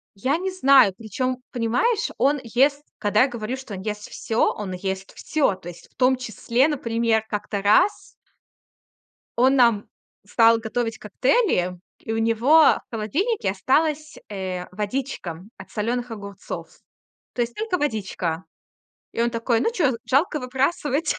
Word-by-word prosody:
Я 260 +9 0
не 380 +2 -2
знаю. 270 - +5
Причём, 245 +4 -3
понимаешь, 395 - +1
он 285 +1 +2
ест 275 +5 +2 0.2
Когда 210 +1 +3
я 265 - +3
говорю, 240 0 -4
что 260 -6 -8
он 190 - -6
ест 210 +1 -5
всё, 225 +1 0
он 205 -3 -6
ест 190 +1 -4
всё. 290 -10 0
То 180 -2 -11
есть, 175 0 -11
в - - -39
том 260 0 +3
числе, 250 +2 0
например, 230 -6 0
как-то 210 -1 -3
раз 210 - +5 1.5
он 260 +3 +4
нам 235 -5 +3 0.4
стал 230 -1 +5
готовить 225 0 -3
коктейли, 210 - +1 0.2
и 225 - -5
у 225 - -1
него 230 +8 +4
в - - +5
холодильнике 245 - -1
осталась, 300 +9 0
э, 185 -3 -4
водичка 205 -4 -4
от - - -12
солёных 240 +3 -2
огурцов. 200 -3 -7 0.7
То 245 - +1
есть, 235 0 -4
только 435 -4 -2
водичка. 190 - -2 0.7
И 230 - 0
он 235 - +1
такой: 230 0 0
"Ну, 455 - +1
че, 315 - +2
жалко 300 +3 +1
выбрасывать?" 275 +4 0
235 Hz, 145 wpm, -23 LUFS, 210-275 Hz, 1.5 s, знаю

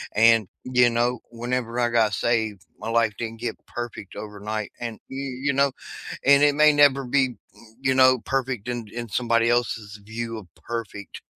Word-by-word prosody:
and, 115 -1 +5 0.2
you 125 -1 +4
know, 120 +1 0
whenever 120 0 -3
I 120 -1 +2
got 115 -3 +2
saved, 110 -3 0
my 115 - -5
life 115 -2 +2
didn't 115 -1 -5
get 120 - -3
perfect 120 -5 -7
overnight 105 0 -5
and, 115 -3 -5
you 135 - -6 0.3
you 140 - +3
know, 140 0 +3 0.5
and 140 0 +6
it 145 -1 +4
may 150 0 +6
never 145 -2 +5
be, 135 +2 +3
m 125 - -11 0.4
you 130 -1 +2
know, 130 -1 +6
perfect 130 -4 -2
in 120 -2 -3
in 120 -1 -5
somebody 115 +1 +2
else's 115 -3 -1
view 115 +1 -5
of 105 -4 -10
perfect, 110 -4 -7
120 Hz, 175 wpm, -24 LUFS, 110-125 Hz, 0.5 s, and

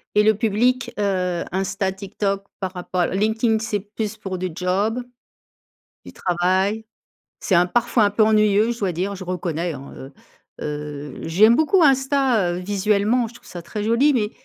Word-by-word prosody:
Et 210 - +5
le 220 - +5
public, 235 +5 +1
heu, 185 -3 0
Insta, 190 +1 -1
TikTok 195 0 -3 0.2
par 190 -1 -4
rapport 180 0 -1
Linkedin 220 +3 +1
c'est 215 -2 -2
plus 210 +2 -5
pour 190 -3 -5
du 185 0 -3
job? 200 +7 0 1.0
Du - - -11
travail. 185 +4 0 0.6
C'est 190 - 0
un 175 +1 +5
parfois 235 +2 +2
un 205 - +3
peu 215 - +2
ennuyeux 215 0 +3
je 235 - -4
dois 195 -5 -1
dire, 190 +4 -2
je 185 - -8
reconnais, 175 -2 -3
hein, 140 0 -9
heu, 135 +1 -10 0.5
heu. 150 -1 -6
J'aime 215 +8 +5
beaucoup 325 +4 +3
Insta, 265 - +3
heu, - - -3
visuellement, 205 +5 +1
je 230 - -16
trouve - - -17
ça 175 -1 -8
très 210 +4 -5
joli, 235 +7 +3
mais 215 -4 0
200 Hz, 170 wpm, -22 LUFS, 180-220 Hz, 1.0 s, Et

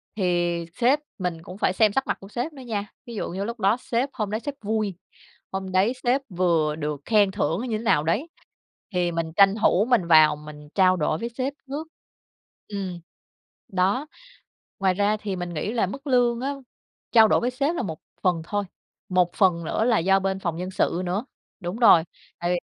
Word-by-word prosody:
thì 175 -3 0
sếp 255 +5 +3 0.2
mình 180 -4 -3
cũng 180 +3 -9
phải 185 - +1
xem 210 +1 +3
sắc 270 - 0
mặt - - -1
của 195 - -11
sếp 245 +9 -4
nữa 270 - -11
nha. 210 -4 -3 0.2
Ví 235 -2 -8
dụ - - -3
như 190 +3 -3
lúc 235 +2 -5
đó 200 +4 +3
sếp 250 +3 -1
hôm 210 -3 -2
đấy 215 - -1
sếp 285 +2 -5
vui, 215 -3 -1 0.6
hôm 190 0 -4
đấy 190 +6 +3
sếp 255 +3 +3
vừa 170 -5 +1
được 150 -2 -3
khen 210 -3 +4
thưởng 185 -2 -1
như 215 -2 -1
thế - - -7
nào 150 - +3
đấy, 255 - 0 0.6
thì 175 -1 0
mình 165 -1 -2
tranh 195 0 +6
thủ 200 +5 +4
mình 210 -9 +3
vào 155 -2 +6
mình 150 0 -11
trao 185 -1 +4
đổi 155 0 0
với 235 - -3
sếp 255 +3 -3 0.2
trước. 305 +3 -5 0.8
Ừm, 190 -4 -5 0.7
đó. 195 +10 +1 0.7
Ngoài 190 -1 +3
ra 205 +2 +2
thì 205 -2 -4
mình 175 -1 -5
nghĩ 180 +8 -2
là 230 -5 +1
mức 275 +9 -8
lương 245 -2 +3
á, 280 +2 -2 0.6
trao 220 -2 +7
đổi - - +3
với 245 - 0
sếp 280 +6 0
là - - -1
một 160 -7 -5 0.2
phần 175 -3 +1
thôi, 205 +3 -2 0.4
một 180 -2 +2
phần 175 -4 +3
nữa 220 - 0
là 235 -2 +3
do 195 +3 +3
bên 190 0 -1
phòng 170 -4 -3
nhân 180 +2 -4
sự 180 -1 0
nữa. 190 +7 -1 0.4
Đúng 175 +4 -4
rồi, 175 -9 +7 0.3
tại 175 0 -1
vì 180 - +1
195 Hz, 205 wpm, -25 LUFS, 175-230 Hz, 0.8 s, trao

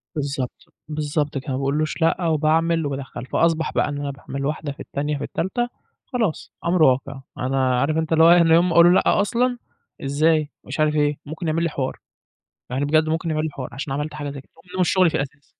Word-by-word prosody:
بالضبط، 140 -4 -4
بالضبط 150 -1 -2
كده، 135 +1 -5
ما 130 - -1
باقولوش 150 +5 -1
لأ 165 +2 +2
وباعمل 160 +1 +2
وبادخّل، 135 -3 -5
فأصبَح 165 +2 +1
بقى - - +1
إن 145 0 -4
أنا 140 -1 -3
باعمل 140 0 -6
واحدة، 150 0 -2
في 140 - -12
التانية، 150 +1 -3
في 145 - -5
التالتة، 240 - -2 0.4
خلاص 225 - -2
أمر 170 -1 +3
واقع. 135 0 +2 0.2
أنا 130 -1 +1
عارف 150 +4 +1
أنت 160 0 0
اللي 160 0 +5
هو 165 - +8
إيه، 175 - +7
أنا 165 -1 +4
يوم 175 +2 +4
ما - - 0
أقول 170 - +8
له 175 - +7
لأ - - +4
أصلًا، 245 +4 +1 0.5
إزاي 150 +2 +2
ومش - - -7
عارف 155 0 +2
إيه، 145 -1 +2
ممكن 160 +3 -5
يعمل 160 +2 0
لي 170 - +1
حوار. 135 -3 -3 0.7
يعني 130 +3 -1
بجد 155 +2 +2
ممكن 165 +1 -1
يعمل 155 0 0
لي 160 - -1
حوار 135 -3 -6
عشان 135 +2 -5
عملت 150 +1 -3
حاجة 150 -1 -5
زي 140 - -8
كده - - -30
وهو 185 0 -5
مش 175 - +2
شُغلي 185 -3 +4
في - - -4
الأساس. 140 +1 -5
155 Hz, 225 wpm, -22 LUFS, 140-165 Hz, 0.7 s, هو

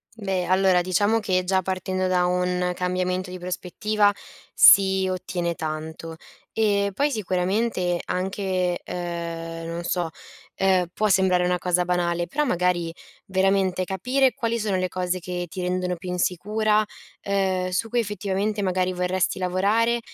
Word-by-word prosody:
Beh, 195 -4 -2
allora 185 -1 +3
diciamo 205 +5 +2
che 185 -4 0
già 190 +1 +1
partendo 185 0 -2
da 180 -1 +2
un 180 0 0
cambiamento 180 +1 -1
di 185 - -6
prospettiva 195 +4 0 0.4
si 190 -1 +6
ottiene 180 -2 -2
tanto 160 +1 -5 0.4
e 205 -2 +2
poi 285 +8 +1
sicuramente, 185 -3 0
anche, 185 -1 -1
ehm 170 -1 -5 0.2
non 170 +1 -4
so, 175 -1 -1 0.5
ehm 190 -2 +2
può 215 +4 0
sembrare 185 -2 +3
una 180 0 +1
cosa 180 0 +1
banale, 175 -1 0
però 300 +10 -1
magari 180 -6 0 0.3
veramente 190 -1 +1
capire 250 +8 +1
quali 230 +1 -1
sono 210 -4 -1
le 185 0 0
cose 185 0 -2
che 180 0 -4
ti 185 +3 -6
rendono 180 0 -1
più 180 +2 -8
insicura, 210 +5 +1 0.4
ehm 190 -2 0
su 180 +5 -1
cui 240 - +1
effettivamente 205 -1 -2
magari 185 -1 0
vorresti 180 +1 0
lavorare 200 +6 +1
185 Hz, 140 wpm, -24 LUFS, 180-200 Hz, 0.5 s, si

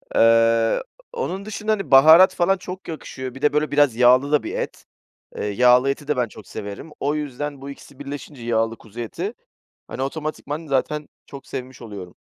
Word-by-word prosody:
Iıı, 115 - +4 0.3
onun 200 - -4
dışında, 215 0 -3
hani, 195 -8 -2
baharat 160 +7 +8
falan 190 +2 +2
çok 185 +1 -9
yakışıyor. 130 -5 -7
Bir 135 - -10
de 150 -1 +2
böyle 150 0 0
biraz 145 -5 +3
yağlı 125 +4 +4
da 150 - +3
bir - - -5
et. - - -5 0.5
Eee, - - -3
yağlı 125 +5 +4
eti 145 +1 -3
de 150 -3 0
ben 125 - +1
çok 105 -1 -14
severim. 100 +10 -8
O 145 +2 0
yüzden 145 -1 -5
bu 140 - -7
2'si 140 0 -13
birleşince 145 -1 -8
yağlı 115 -1 0
kuzu 110 +1 -13
eti, 115 -2 -4 0.6
hani, 130 - -5
otomatikman 155 +2 -4
zaten 145 +2 -1 0.2
çok 140 -1 -11
sevmiş 130 -1 -7
oluyorum. 100 -5 -9
140 Hz, 180 wpm, -22 LUFS, 120-150 Hz, 0.6 s, baharat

